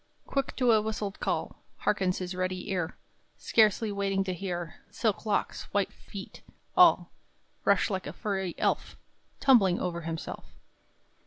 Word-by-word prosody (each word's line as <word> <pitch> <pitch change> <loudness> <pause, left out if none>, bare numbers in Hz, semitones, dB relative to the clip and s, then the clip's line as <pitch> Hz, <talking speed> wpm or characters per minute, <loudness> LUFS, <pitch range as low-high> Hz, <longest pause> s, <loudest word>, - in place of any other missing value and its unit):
Quick 275 -1 -2
to 250 -2 +3
a 220 -1 +5
whistled 210 -2 -3
call - - -2 0.2
Hearkens 190 -3 +1
his 180 0 -4
ready 185 +1 -2
ear, 180 -2 -2 0.4
Scarcely 215 -1 +3
waiting 195 -1 0
to 185 -1 -2
hear; 175 -2 -4
Silk 220 -1 -1
locks, 205 - 0
white 200 -1 +1
feet, 195 -1 -10 0.3
all - - +6 0.5
Rush, - - +4
like 190 -4 -2
a 145 - -5
furry 190 -3 -2
elf - - 0 0.4
Tumbling 205 -10 +5
over 170 -2 -2
himself. 165 0 -5
195 Hz, 140 wpm, -29 LUFS, 180-210 Hz, 0.5 s, all